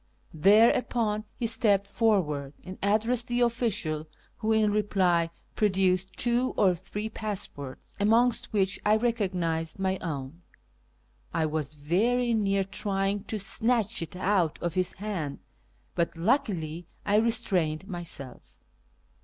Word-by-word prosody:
Thereupon 215 +4 +3
he 240 - -2
stepped 205 -3 +2
forward 170 - +1
and 185 +1 -9
addressed 225 +4 +1
the 240 0 0
official, 210 -11 0 0.3
who 220 - -1
in 215 -1 +3
reply 185 -5 +2 0.2
produced 190 -2 +1
two 245 +1 +1
or 190 -3 +4
three 195 +5 -5
passports, 195 -11 -6
amongst 230 +4 +2
which 195 -2 +1
I 210 +1 +4
recognised 185 -8 -1
my 190 -1 -1
own. 150 0 -5 0.9
I 160 - +2
was 155 -1 -3
very 230 +12 +1
near 200 -3 +1
trying 195 0 -1
to 220 - -3
snatch 225 +1 +1
it 165 - -6
out 185 -3 +1
of 170 -2 -2
his 185 0 0
hand, 185 -8 -4 0.6
but 170 -1 -1
luckily 175 - 0 0.2
I 205 0 +3
re 225 +2 +3
strained 190 -7 +1
myself. 170 -8 -5
195 Hz, 125 wpm, -28 LUFS, 170-220 Hz, 0.9 s, or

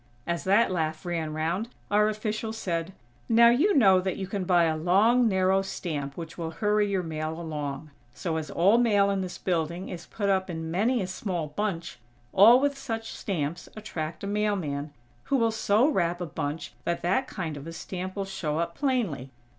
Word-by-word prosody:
As 170 -1 -2
that 200 +3 +4
laugh 160 -2 -2
ran 165 -3 -2
round, 165 +8 -2 0.2
our 210 +1 +4
official 215 +1 -3
said: 175 -5 -3 0.4
"Now 235 +1 +7
you 300 - +3
know 190 -7 +6
that 190 0 -2
you 195 - -3
can 195 -1 -3
buy 175 -1 +4
a 160 -1 +2
long, 205 +9 +4
narrow 190 -1 +3
stamp 150 -7 -4
which 165 0 -7
will 165 -1 -2
hurry 210 +4 +1
your 190 -2 0
mail 160 0 -4
along. 150 -2 -5 0.2
So, 160 +5 -3
as 155 -1 -4
all 200 +7 +4
mail 205 -4 +3
in 195 -1 0
this 185 -1 -5
building 170 0 -2
is 170 -2 -7
put 205 -3 -3
up 190 -1 +1
in 160 -1 -4
many 220 +6 +1
a - - -2
small 185 -4 -3
bunch, 175 -4 -3 0.3
all 230 +6 +8
with 285 +1 +1
such 225 -4 -4
stamps 170 -2 -3
attract 160 -7 -5
a - - -3
mailman, 190 -9 -1 0.3
who 275 - +1
will 230 -2 +2
so 220 +3 +3
wrap 175 - +1
a 175 - -3
bunch 155 -1 -4
that 170 0 -2
that 195 +10 +1
kind 165 -9 -4
of 145 +2 -8
a - - -5
stamp 185 +3 -6
will 200 -1 -2
show 170 -6 -3
up 170 0 -1
plainly. 220 - -1
185 Hz, 195 wpm, -27 LUFS, 160-210 Hz, 0.4 s, all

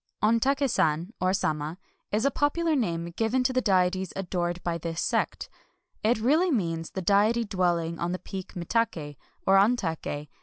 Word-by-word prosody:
"Ontak^ 265 +6 +3
San" 170 -3 0
(or 185 0 +3
"Sama") 155 -3 -1 0.3
is 215 +4 +1
a 280 - +3
popular 315 +3 +1
name 170 - -1
given 235 +3 +1
to 260 +1 +1
the 255 - +2
deities 185 -3 +1
adored 175 -2 -2
by 170 -1 -1
this 165 0 -4
sect. - - -1 0.5
It 230 +3 +2
really 300 +11 +3
means 165 - -1
the 190 - -5
Deity 215 +5 +3
dwelling 175 -4 0
on 170 +1 -1
the 185 - -1
peak 190 0 -8
Mitak^, 170 -5 -1 0.3
or 195 0 +5
Ontak^. 165 -8 0
190 Hz, 160 wpm, -27 LUFS, 170-230 Hz, 0.5 s, or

